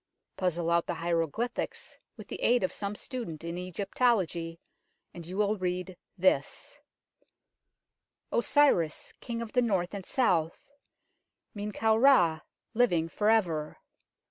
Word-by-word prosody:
Puzzle 175 -2 -1
out 170 0 +2
the 175 - -2
hieroglyphics 170 +8 -2 0.2
with - - -10
the - - -7
aid 245 -2 +3
of 185 - 0
some 200 0 -4
student 205 - -6
in 170 0 -4
Egyptology, 180 -2 -1 0.5
and 170 -2 -9
you 185 +2 -6
will 210 0 +1
read 180 0 -3 0.2
this 185 +1 0 0.8
" - - -57
Osiris, 235 - +2
King 235 -2 -4
of 225 - -10
the 250 - +4
North 195 -7 0
and 200 -2 -5
South, 175 -9 +1 1.0
Men 210 0 -4
kau 220 +1 +2
Ra, 220 - +5 0.3
living 175 -9 +2
for 210 +5 +1
ever. 170 -9 +1
185 Hz, 130 wpm, -29 LUFS, 170-225 Hz, 1.0 s, Ra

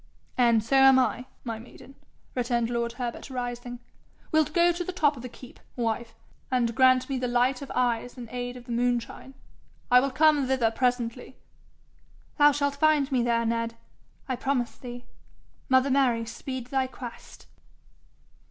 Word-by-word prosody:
'And 235 -3 +3
so 270 +5 +2
am 270 0 +7
I, 255 0 0 0.2
my 230 -3 -4
maiden,' 245 +3 -14 0.4
returned 240 -2 0
lord 235 -1 -1
Herbert, 245 +2 -5
rising. 245 -1 -5 0.5
'Wilt 315 -1 +2
go 345 -1 +4
to 345 +1 -3
the 370 - -4
top 305 -5 +2
of 245 - -9
the 250 - -7
keep, 245 +1 -14 0.2
wife, 230 -1 -2 0.3
and 240 -3 +1
grant 255 +1 +4
me 270 -2 -2
the 250 - -1
light 245 +2 +1
of 280 - -7
eyes 245 0 0
in 240 -2 -7
aid 245 0 -4
of 245 - -12
the 240 - -8
moonshine? 245 +2 -2 0.6
I 250 - +8
will 275 +2 0
come 295 0 +3
thither 255 -4 +2
presently.' 245 +1 -2 1.0
'Thou 295 0 +7
shalt 285 0 -1
find 300 -2 +3
me 255 -2 +2
there, 235 -1 +1
Ned, 230 0 -1 0.5
I 260 - -1
promise 255 -3 -1
thee. 245 -1 -9 0.6
Mother 260 +1 +4
Mary 250 -4 +2
speed 255 +2 -7
thy 265 -1 +1
quest?' 250 -2 -10
250 Hz, 160 wpm, -27 LUFS, 240-270 Hz, 1.0 s, I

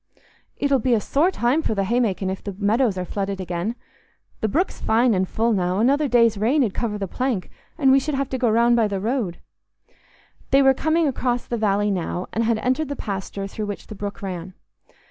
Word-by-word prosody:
It'll 280 -2 +2
be 245 +1 +2
a - - +2
sore 295 - +2
time 270 -3 +1
for 220 - -1
th' 195 -1 0
haymaking 205 -4 0
if 190 - -6
the 200 -2 -6
meadows 215 +1 +1
are 180 - -2
flooded 195 +1 -3
again. 180 +5 -3 0.6
The 220 - 0
brook's 330 - -1
fine 230 +2 +3
and 185 -1 0
full 230 +1 +1
now: 180 -2 0
another 280 +7 +3
day's 230 -4 +3
rain 260 +7 +3
'ud 210 -6 -1
cover 220 -3 -2
the 195 -1 -3
plank, 245 -2 -2 0.3
and 275 -5 +4
we 270 - +6
should 295 +1 -2
have 275 0 -1
to 260 - -3
go 240 -2 +2
round 235 +2 +4
by 230 -2 +3
the 200 -2 -3
road." 215 -4 -2 1.1
They 275 +1 +5
were 270 0 +6
coming 315 +4 +1
across 245 -2 -1
the 240 - -3
valley 205 -2 +1
now, 180 -1 -2
and 230 - +1
had 230 0 +1
entered 260 +6 0
the 285 - -3
pasture 195 -3 -5
through 210 +2 -5
which 205 - -6
the 215 - -9
brook 200 0 -6
ran. 185 -1 -6
225 Hz, 215 wpm, -23 LUFS, 195-260 Hz, 1.1 s, we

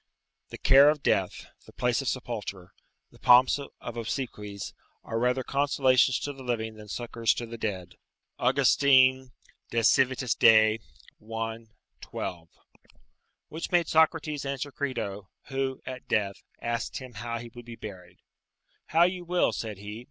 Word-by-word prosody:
["The - - -8
care 140 +2 +7
of 150 -2 -1
death, 95 -2 0 0.2
the - - -15
place 125 +1 0
of 135 - -6
sepulture, 105 -8 -4 0.4
the - - -19
pomps 125 +3 +6
of 130 -3 -9
obsequies, 105 -4 -5 0.3
are 115 - -3
rather 125 +2 +1
consolations 130 -2 +3
to 145 - -4
the 135 - -12
living 115 -3 -2
than 105 -1 -12
succours 115 +1 -1
to 120 - -4
the 115 0 -9
dead." 95 -5 -4 0.4
August. 130 +1 +3
De 130 -2 +5 0.4
Civit. 125 +2 +2
Dei, 110 0 +6 0.4
i. 115 +1 -5 0.4
12.] 85 -2 -6 1.0
Which 160 +2 -6
made 175 -2 +3
Socrates 160 -2 +2
answer 140 +1 -4
Crito, 105 -9 -4 0.2
who, 135 -1 -2
at 130 0 -8
death, 100 -2 -1 0.2
asked 120 0 -3
him 130 -2 -9
how 115 +2 -4
he 120 0 -9
would 120 -1 -11
be 120 -1 -9
buried: 90 -5 -11 0.7
"How 165 +2 +4
you 180 0 0
will," 175 +1 +1
said 110 -3 -5
he. 105 +2 -8
120 Hz, 145 wpm, -27 LUFS, 110-135 Hz, 1.0 s, care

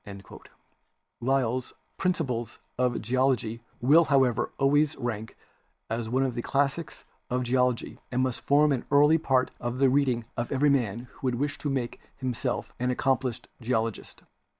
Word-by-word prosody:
'* - - -46
Lyell's 130 -1 0 0.2
"Principles 135 -11 -1 0.2
of 125 -2 0
Geology" 120 -1 0 0.2
will, 155 +7 +6
however, 135 -5 +2
always 145 +2 +3
rank 110 -4 -4 0.5
as 115 -1 -2
one 130 +3 +2
of 130 -2 -1
the 120 - -3
classics 140 +5 -1 0.2
of 125 +1 0
Geology 125 -1 0
and 125 +1 +1
must 130 -2 -2
form 145 +1 +4
an 130 -4 0
early 150 +3 +5
part 130 -4 +1
of 120 +1 -3
the 135 0 +4
reading 130 -4 +1
of 120 0 -3
every 140 +1 +3
man 120 -5 0
who 135 - -5
would 125 - +1
wish 145 +3 -2
to 145 - -2
make 130 -3 -2 0.2
himself 130 -3 -3
an 125 +1 0
accomplished 125 -1 0
geologist. 115 -2 -2
130 Hz, 150 wpm, -27 LUFS, 120-140 Hz, 0.5 s, will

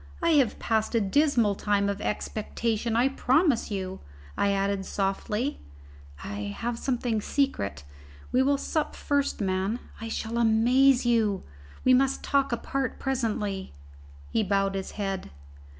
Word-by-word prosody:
I 335 - +1
have 275 -8 +3
passed 220 +1 0
a - - +5
dismal 235 0 +3
time 200 0 +1
of 200 0 -2
expectation, 225 +2 -2
I 240 +3 +4
promise 270 0 +2
you." 190 -2 -4 0.4
I 200 - +2
added 195 0 0
softly, 210 +7 -2 0.6
"I 100 0 -5
have 235 0 -3
something 240 -4 -1
secret 235 - -1 0.5
we 255 - +3
will 280 +1 +3
sup 310 +2 -2
first, 285 -5 0
man 190 +3 0 0.2
I 225 - -5
shall 225 +1 -3
amaze 245 +4 +4
you! 220 -5 +2 0.4
We 255 - +6
must 270 +1 +2
talk 280 -2 +1
apart 265 +2 -2
presently." 215 -7 -2 0.6
He - - +2
bowed 195 -1 +1
his 195 -1 -4
head. 195 -2 -3
225 Hz, 135 wpm, -27 LUFS, 200-260 Hz, 0.6 s, We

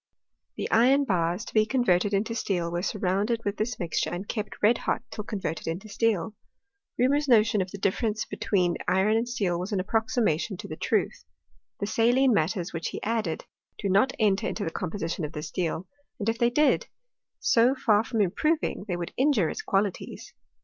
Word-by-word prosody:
The - - -3
iron 260 +5 +5
bars 180 -2 0
to - - -10
be 215 - +5
converted 205 -7 +2
into 210 +3 0
steel 175 -7 -1
were 175 0 -1
surround 195 +1 0
ed 230 -1 -1
with 205 0 -1
this 220 +2 -2
mixture, 170 -2 -1
and 180 +3 -5
kept 215 -3 -4
red 230 +3 +5
hot - - -1
till 210 - -5
converted 195 -8 -4
into 175 +6 -4
steel. 220 -1 0 0.7
Reaumur's 285 +4 +2
notion 220 -4 +4
of 185 - -3
the 200 - -7
difference 210 +2 0
be - - -7
tween 185 -5 +1
iron 190 +4 +3
and 230 +2 0
steel 190 -8 -1
was 185 +4 -4
an 200 - 0
approximation 215 -2 0
to - - -8
the - - -6
truth. - - -1 0.6
The 200 - -1
saline 240 +4 +3
matters 180 +1 0
which 165 0 -3
he - - -6
added 215 -7 -2 0.3
do 200 - -2
not 200 +7 +4
enter 205 -3 +2
into 210 - -3
the 165 - -2
composition 175 -2 -3
of 150 +2 -5
steel; 180 0 -3 0.3
and 205 - -4
if 225 +1 0
they 235 -1 +4
did, 295 +5 +2 0.5
so 240 +3 +3
far 215 -5 +3
from 225 -2 -1
improving, 300 - 0
they 180 -3 -2
would 170 -1 -5
injure 255 - +3
its - - -5
qualities. 195 -1 -2
210 Hz, 190 wpm, -27 LUFS, 180-230 Hz, 0.7 s, iron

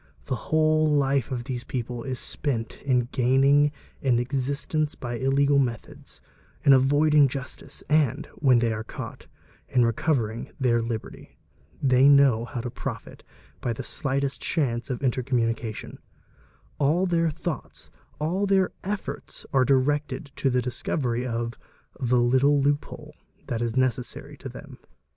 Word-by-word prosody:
The 130 - -4
whole 155 0 +3
life 140 -4 +2
of 120 -2 -2
these 125 -1 -4
people 120 -1 -4
is 130 0 -4
spent 125 -7 -3
in 125 -3 +1
gaining 135 +3 +4 0.3
an 130 -3 +2
existence 140 +4 -1
by 120 -1 -5
illegal 140 +2 +3
methods, 120 -5 -4 0.4
in 140 - +7
avoiding 145 +2 +5
justice, 135 0 -7
and, 150 -2 +2
when 130 -4 +4
they 115 -1 +1
are 110 0 -4
caught, - - -8 0.4
© - - -28
in 125 -2 +5
recovering 115 -2 -1
their 120 -3 +2
liberty; 115 -1 -6 0.5
they 130 +1 +5
know 135 -5 +5
how 120 0 -5
to 120 0 -5
profit - - -6 0.4
by 120 - -1
the - - -6
slightest 140 -1 -2
chance 125 -7 -1
of 130 +1 -4
intercommunication; 120 -4 -1 0.8
all 155 +6 +3
their 165 -2 +2
thoughts, 165 0 -6 0.3
all 180 +7 0
their 190 -1 +3
efforts 200 +1 -5
are 135 -1 +5
directed 140 +1 +1
a - - -35
to 135 - +1
the 125 -1 +1
discovery 125 0 -2
of 115 0 -3 0.4
"the 125 0 +2
little 130 +4 +4
loophole," 145 +1 -2 0.3
that 115 -1 -3
is 120 +1 -2
necessary 125 -1 -1
to - - -8
them. - - -11
130 Hz, 145 wpm, -26 LUFS, 120-145 Hz, 0.8 s, in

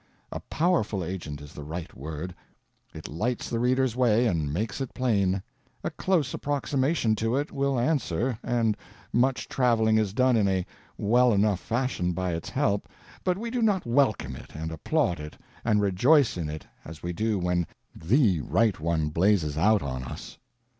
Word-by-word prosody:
A - - -4
powerful 150 - 0
agent 80 -5 -5
is 75 +1 -11
the 75 - -8
right 80 +3 -6
word: 80 +5 -6 0.6
it - - -8
lights 110 +11 -2
the 115 - 0
reader's 125 0 +2
way 120 -2 +3
and 80 -9 0
makes 100 - -2
it 135 - -5
plain; 100 -7 +1 0.4
a - - -2
close 165 -9 0
approximation 140 -3 0
to 115 +3 0
it 145 +2 -1
will 140 -2 0
answer, 125 - 0
and 115 -3 +1 0.4
much 125 +2 +2
traveling 110 -4 +3
is 105 -3 0
done 130 0 +4
in 105 -3 +3
a 95 -2 +1 0.3
well 120 +3 +4
enough 100 -2 +2
fashion 110 -3 -1
by 90 0 -1
its 80 - -4
help, 105 -7 0 0.3
but 180 0 +1
we 230 +3 -4
do 245 -1 -1
not 205 -5 +2
welcome 115 - +1
it - - -12
and 80 +1 -4
applaud 90 - 0
it 75 0 -8 0.3
and 105 -3 +3
rejoice 115 - +4
in 85 -4 -3
it 75 0 -6 0.2
as 80 0 -10
we 90 0 -2
do 110 +4 0
when 90 -2 0 0.3
_the 100 - +3
_right 110 +3 +1
one 80 -1 0
blazes 85 -2 +2
out 105 +7 +3
on 65 -2 -4
us. 60 - -8
105 Hz, 175 wpm, -27 LUFS, 85-125 Hz, 0.6 s, done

